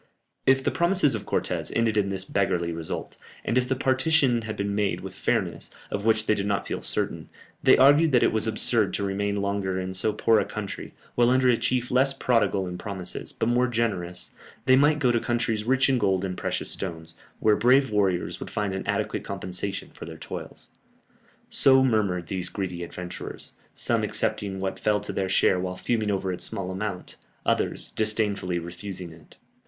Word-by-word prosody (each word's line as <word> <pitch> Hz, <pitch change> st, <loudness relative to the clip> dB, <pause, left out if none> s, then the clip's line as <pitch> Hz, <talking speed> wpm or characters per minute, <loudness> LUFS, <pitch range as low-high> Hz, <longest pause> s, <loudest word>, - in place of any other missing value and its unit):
If 135 Hz, 0 st, +5 dB
the -, -, +1 dB
promises 170 Hz, -5 st, +3 dB
of 110 Hz, -, -4 dB
Cortès -, -, -1 dB
ended 115 Hz, -1 st, +2 dB
in 100 Hz, -2 st, +2 dB
this 95 Hz, -1 st, -2 dB
beggarly 90 Hz, -4 st, 0 dB
result, 80 Hz, -1 st, -5 dB, 0.3 s
and 115 Hz, -, 0 dB
if 125 Hz, 0 st, +2 dB
the 130 Hz, -, +2 dB
partition 130 Hz, -1 st, +2 dB
had 110 Hz, -1 st, -5 dB
been 100 Hz, 0 st, -1 dB
made 100 Hz, -1 st, 0 dB
with -, -, -7 dB
fairness, -, -, -1 dB, 0.2 s
of 100 Hz, +1 st, -3 dB
which 110 Hz, -1 st, +3 dB
they 110 Hz, -, +3 dB
did 100 Hz, -1 st, -2 dB
not 100 Hz, -2 st, 0 dB
feel -, -, -3 dB
certain, -, -, -2 dB, 0.3 s
they -, -, +6 dB
argued 145 Hz, +4 st, +6 dB
that 125 Hz, -, +4 dB
it -, -, +3 dB
was 110 Hz, 0 st, +1 dB
absurd 110 Hz, -1 st, +1 dB
to 100 Hz, -, -2 dB
remain 100 Hz, +1 st, -1 dB
longer 100 Hz, -2 st, -1 dB
in 95 Hz, 0 st, -4 dB
so 95 Hz, +4 st, +1 dB
poor 110 Hz, +1 st, +3 dB
a -, -, +2 dB
country, 105 Hz, -2 st, -6 dB, 0.2 s
while 120 Hz, 0 st, +3 dB
under 130 Hz, 0 st, +4 dB
a 120 Hz, -, +5 dB
chief 125 Hz, +1 st, -1 dB
less 135 Hz, +2 st, +3 dB
prodigal 115 Hz, -7 st, +1 dB
in 90 Hz, 0 st, -6 dB
promises, 95 Hz, -4 st, -5 dB
but -, -, -2 dB
more 120 Hz, +1 st, +3 dB
generous, 95 Hz, -7 st, -2 dB, 0.3 s
they 130 Hz, -1 st, +6 dB
might 145 Hz, +3 st, +4 dB
go 130 Hz, -4 st, +2 dB
to 120 Hz, -, +2 dB
countries 115 Hz, -3 st, -1 dB
rich 130 Hz, +2 st, +3 dB
in 130 Hz, -2 st, +2 dB
gold 95 Hz, -3 st, +1 dB
and 90 Hz, -1 st, -3 dB
precious -, -, -2 dB
stones, 80 Hz, -3 st, -5 dB, 0.3 s
where 105 Hz, -1 st, +4 dB
brave 130 Hz, +2 st, +4 dB
warriors 95 Hz, -4 st, 0 dB
would -, -, -6 dB
find 105 Hz, -2 st, -2 dB
an 95 Hz, -, -4 dB
adequate -, -, -1 dB
compensation 95 Hz, +2 st, -4 dB
for -, -, -9 dB
their 80 Hz, -1 st, -9 dB
toils. -, -, -8 dB, 0.8 s
So 130 Hz, -1 st, +5 dB
murmured 100 Hz, -8 st, +1 dB
these 90 Hz, +1 st, -2 dB
greedy 90 Hz, -3 st, -4 dB
adventurers; 90 Hz, +1 st, -7 dB, 0.2 s
some -, -, +1 dB
accepting 95 Hz, -2 st, -1 dB
what 95 Hz, 0 st, -3 dB
fell 105 Hz, -1 st, +2 dB
to 105 Hz, -, -5 dB
their 95 Hz, -1 st, -1 dB
share 95 Hz, 0 st, +3 dB
while 90 Hz, 0 st, -3 dB
fuming 110 Hz, +2 st, -1 dB
over 95 Hz, -2 st, -1 dB
its 90 Hz, -, -2 dB
small 95 Hz, -4 st, -4 dB
amount, 95 Hz, -1 st, -5 dB, 0.3 s
others -, -, 0 dB
disdainfully 105 Hz, -4 st, 0 dB
refusing 85 Hz, +1 st, -6 dB
it. 80 Hz, -1 st, -18 dB
105 Hz, 190 wpm, -26 LUFS, 95-120 Hz, 0.8 s, they